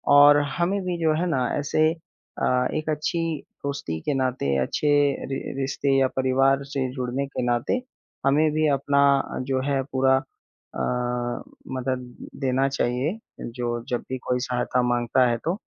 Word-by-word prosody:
और 145 0 +8 0.2
हमें 190 +4 +1
भी 180 -1 -1
जो 160 -1 +4
है 180 - +1
ना 130 -6 +1
ऐसे 150 +2 +1
अ, 125 -6 -2
एक 155 0 -2
अच्छी 155 +2 -1 0.4
दोस्ती 140 - -3
के 145 - -1
नाते, 130 - 0
अच्छे 105 - -1 0.4
रि 135 - -1 0.2
रिश्ते 135 0 0
या 135 - +4
परिवार 135 +1 +3
से 135 -2 -2
जुड़ने 130 +1 -2
के 135 - -4
नाते 120 - 0 0.4
हमें 150 +3 +4
भी 155 +1 +2
अपना 140 +1 +1 0.5
जो 130 -1 +1
है 135 -1 +2
पूरा 130 0 +4
अ, 135 0 -11 1.0
मदद 125 -1 -3 0.3
देना 135 0 +2
चाहिए, 135 - -1 0.2
जो 120 0 -3
जब 120 - -1
भी 130 - -2
कोई 125 0 +1
सहायता 125 0 0
माँगता 120 +1 +2
है 120 - +1
तो। 170 - +1
135 Hz, 155 wpm, -25 LUFS, 125-145 Hz, 1.0 s, और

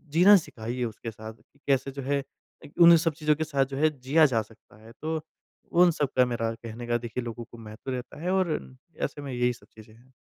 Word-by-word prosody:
जीना 195 +5 +8
सिखाइए 120 -5 -5
उसके 115 0 -6
साथ, 110 +1 -9
कि 125 +5 -29
कैसे 135 0 +1
जो 140 +1 -6
है 140 +1 -1 0.6
उन 170 0 +10
सब 165 - +2
चीज़ों 150 0 +1
के 160 - -2
साथ 140 -3 +1
जो 135 0 -7
है 155 +2 +4
जिया 145 +5 +4
जा 120 -6 +2
सकता 110 -1 -17
है। 115 - -12
तो 160 0 -2 0.6
उन 180 - +7
सब 145 -4 -1
का 125 - +6
मेरा 115 -2 -2
कहने 115 +1 -8
का 120 0 +2
देखिए 120 +1 -5
लोगों 120 0 -6
को 120 - -11
महत्व 110 +4 -8
रहता 130 +4 -6
है 180 +2 -1
और 190 -3 +2 0.5
ऐसे 145 +1 -3
में 140 -2 -6
यही 125 0 +1
सब - - -17
चीज़ें 110 0 -15
हैं। 125 +3 -23
130 Hz, 230 wpm, -27 LUFS, 115-150 Hz, 0.6 s, उन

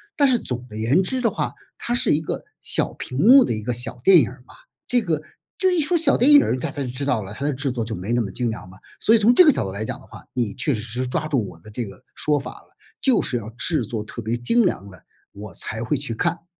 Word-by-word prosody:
但 285 - +4
是 250 -3 +3
总 125 - -5
的 105 -3 -10
言 135 +12 +2
之 255 +6 -1
的 230 - +2
话， - - -3 0.2
它 240 - -3
是 240 - +2
一 155 - -1
个 155 - -5 0.2
小 - - 0
屏 130 - -6
幕 255 - +7
的 - - -2
一 110 - -4
个 125 +4 -3
小 120 0 -2
电 195 -2 +7
影 125 -7 +2
儿 125 -1 -15
嘛， - - -16 0.3
这 245 -2 +2
个， 155 -3 -1 0.4
就 375 - +3
一 360 -2 +1
说 315 +3 +1
小 320 -4 +4
电 265 +5 +4
影 290 - +9
儿， - - -1
大 125 - -4
家 140 - -6
就 130 - -3
知 130 +3 -3
道 135 -6 0
了， 100 +2 -9
它 140 - -5
的 145 - 0
制 135 0 -2
作 120 -3 -3
就 110 - -5
没 95 +5 -5
那 120 - +2
么 100 - -6
精 120 +3 -1
良 110 -3 -7
嘛。 95 +1 -16 0.2
所 220 - +3
以 230 - +5
从 220 +3 +5
这 365 - +8
个 305 - +7
角 135 - -1
度 95 - -5
来 100 +3 -4
讲 - - -5
的 - - -18
话， - - -13
你 115 -5 -2
确 145 - 0
确 110 - -3
实 120 +3 -3
实 - - -3
抓 155 +4 -2
住 130 -9 -1
我 80 - -12
的 105 - -14
这 115 +3 -4
个 95 -3 -13
说 150 -1 +1
法 140 - -7
了， - - -20 0.2
就 265 -3 +3
是 125 - 0
要 110 - -7
制 140 +4 +3
作 110 0 -4
特 115 +2 -8
别 110 +2 -1
精 190 - +3
良 100 - -2
的， 90 -3 -16 0.3
我 100 -1 -10
才 110 +4 -3
会 125 +6 -1
去 130 -4 -4
看。 170 +4 -2
125 Hz, 320 characters per minute, -22 LUFS, 110-180 Hz, 0.4 s, 影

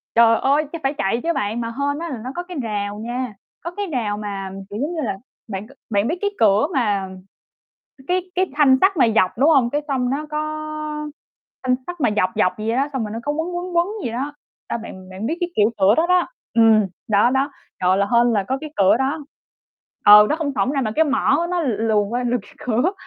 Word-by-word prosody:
Trời 230 -1 +6
ơi, 285 +3 +2
cái 335 - -4
phải 270 +1 +1
chạy 195 +4 0
chứ 335 - +1
bạn. 215 0 -2
Mà 230 - -3
hên 285 +1 0
á, 340 0 -4
là 265 - -4
nó 255 - -5
có 350 - -3
cái 355 -1 -8
rào 205 -2 -3
nha, 240 +1 -4 0.3
có 340 - -4
cái 405 +3 -4
rào 230 - -2
mà, 200 -2 -5 0.2
kiểu 205 - -6
giống 315 +5 -2
như 320 - -2
là, 210 -6 -2 0.3
bạn 195 0 -5
c - - -24 0.2
bạn 205 0 +1
biết 330 - -1
cái 405 - +1
cửa 210 +3 +4
mà 205 -8 0 1.0
cái 365 0 -1
cái 370 0 +1
thanh 285 -3 +5
sắt 385 0 +3
mà 265 - +5
dọc, 185 -4 +4
đúng 285 +5 +5
hông? 265 -6 +4
Cái 290 - 0
xong 255 -3 0
nó 290 +3 -2
có 300 0 -1 1.2
thanh 255 0 +2
sắt 355 -1 -7
mà 245 - +3
dọc 185 -3 +2
dọc 185 - +3
vậy 220 +1 -1
đó, 275 +2 +1
xong 260 -4 -2
rồi 210 - -5
nó 225 - -4
có 290 - -1
quấn 325 +4 -3
quấn 355 0 -4
quấn 340 +1 +4 0.2
vậy 235 - -2
đó. 275 +5 -3 0.3
A, - - -2
bạn 190 -5 -10
bạn 190 +4 -5
biết 320 - -1
cái 350 0 -1
kiểu 210 +1 +4
cửa 195 +2 +5
đó 325 +5 +2
đó 360 0 +3 0.3
ừm, 225 -2 +5 0.2
đó 210 +3 +4
đó. 270 +2 +1 0.3
Trời 185 +1 +4
là 200 - +2
hên 240 0 +4
là 205 -3 +1
có 265 - 0
cái 305 -1 -8
cửa 195 0 +5
đó. 280 +4 -1 0.8
Ừ, 210 0 +10
nó 305 - +2
không 310 -4 -2
xổng 205 +5 +1
ra 275 - 0
mà 230 -5 -1
cái 320 - +5
mỏ 275 -1 +2
của 340 +3 0
nó 355 0 -1
l 290 - -1
luồn 215 -2 +1
qua 245 +3 -2
lược 245 0 0
cái - - -18
cửa, 250 - 0
250 Hz, 245 wpm, -21 LUFS, 210-305 Hz, 1.2 s, Ừ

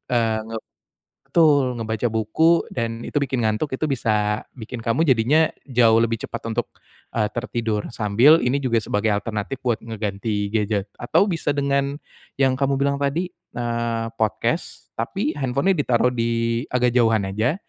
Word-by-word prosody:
eee, 115 -2 +1
nge 115 - -3 0.7
betul, 145 -7 +3
ngebaca 110 +1 -1
buku 135 +10 +2
dan 115 -1 -3
itu - - -9
bikin 125 -4 0
ngantuk 110 +8 -1
itu 130 +4 -1
bisa 105 -6 0
bikin 115 -1 -8
kamu 125 +9 +1
jadinya 135 +6 +4 0.2
jauh 115 -4 +4
lebih 115 -1 0
cepat - - -6
untuk, 115 +1 -1 0.5
eee, 110 -2 +1
tertidur, 115 -3 -2
sambil 120 +9 +5
ini 125 +3 +1
juga 115 -5 0
sebagai 105 +1 0
alternatif 110 +5 -4
buat 120 -3 0
ngeganti 105 -2 -3
gadget. 105 -2 -1
Atau 195 +11 +2
bisa 160 -4 -1
dengan 140 0 0 0.4
yang 130 -2 +2
kamu 140 0 +1
bilang 140 0 +1
tadi, 155 +6 -1
eee, 115 -5 -3
podcast, 110 -1 -2
tapi 155 - -1
handphone-nya 140 +8 +1
ditaruh 125 -3 +2
di 115 0 0
agak 125 -1 +1
jauhan 115 -3 +3
aja. 110 +8 0
120 Hz, 150 wpm, -22 LUFS, 110-140 Hz, 0.7 s, sambil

